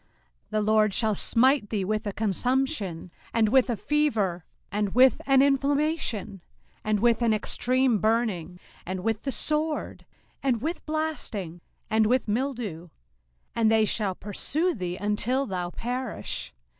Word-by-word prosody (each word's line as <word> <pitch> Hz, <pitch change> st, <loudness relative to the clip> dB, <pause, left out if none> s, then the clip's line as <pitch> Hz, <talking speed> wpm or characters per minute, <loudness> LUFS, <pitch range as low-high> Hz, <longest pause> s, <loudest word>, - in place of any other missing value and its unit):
05:028:022 -, -, -39 dB, 0.4 s
The 215 Hz, 0 st, +1 dB
LORD 215 Hz, -1 st, +3 dB
shall 220 Hz, -2 st, +2 dB
smite 250 Hz, +2 st, +3 dB
thee 200 Hz, -4 st, -1 dB
with 215 Hz, +2 st, -2 dB
a -, -, -1 dB
consumption, 220 Hz, -, -1 dB, 0.2 s
and 220 Hz, -2 st, +3 dB
with 265 Hz, +2 st, +4 dB
a 235 Hz, -, -1 dB
fever, 215 Hz, -, 0 dB, 0.3 s
and 205 Hz, 0 st, -1 dB
with 255 Hz, -1 st, +5 dB
an 270 Hz, -1 st, +5 dB
inflammation, 280 Hz, -, 0 dB, 0.4 s
and 215 Hz, -1 st, 0 dB
with 235 Hz, 0 st, +3 dB
an 230 Hz, -2 st, +3 dB
extreme 250 Hz, +2 st, +1 dB
burning, 205 Hz, -6 st, 0 dB, 0.2 s
and 185 Hz, +1 st, -4 dB
with 220 Hz, +2 st, -1 dB
the 275 Hz, -, -3 dB
sword, 305 Hz, +2 st, -1 dB, 0.3 s
and 260 Hz, -4 st, +1 dB
with 320 Hz, +8 st, -4 dB
blasting, 280 Hz, -, -3 dB, 0.3 s
and 220 Hz, 0 st, +2 dB
with 255 Hz, +2 st, +1 dB
mildew; 215 Hz, -, -3 dB, 0.7 s
and 225 Hz, -1 st, +3 dB
they 220 Hz, -1 st, +4 dB
shall 205 Hz, -3 st, 0 dB
pursue 310 Hz, -, -1 dB
thee 180 Hz, -4 st, -4 dB
until 215 Hz, +7 st, 0 dB
thou 180 Hz, -6 st, -3 dB
perish. 245 Hz, +4 st, -4 dB
225 Hz, 145 wpm, -26 LUFS, 205-265 Hz, 0.7 s, with